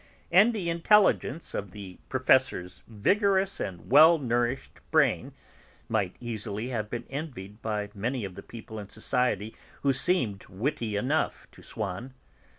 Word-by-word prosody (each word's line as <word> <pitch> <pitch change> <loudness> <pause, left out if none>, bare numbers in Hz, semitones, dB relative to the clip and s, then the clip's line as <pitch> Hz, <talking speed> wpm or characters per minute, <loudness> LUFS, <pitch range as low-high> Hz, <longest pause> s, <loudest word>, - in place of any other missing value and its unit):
And 200 +7 +6
the 205 -7 -3
intelligence 170 0 +3
of 100 - -3
the 95 -1 -10
Professor's 130 -9 +2
vigorous 195 - +1
and 90 +3 -6
well 160 +4 +8
nourished 120 -1 -1
brain - - +2 0.6
might 100 -5 -1
easily 110 -1 -4
have 110 -4 -3
been 120 +1 -5
envied 125 -9 -6
by 105 -2 -3
many 115 +3 -2
of 95 - -7
the - - -9
people 110 -1 -9
in 100 -1 -9
society 110 -2 -1 0.3
who 140 -1 +3
seemed 125 - 0
witty 115 +1 -2
enough 130 +10 0
to - - -16
Swann. 110 +5 -5
120 Hz, 140 wpm, -28 LUFS, 105-145 Hz, 0.6 s, well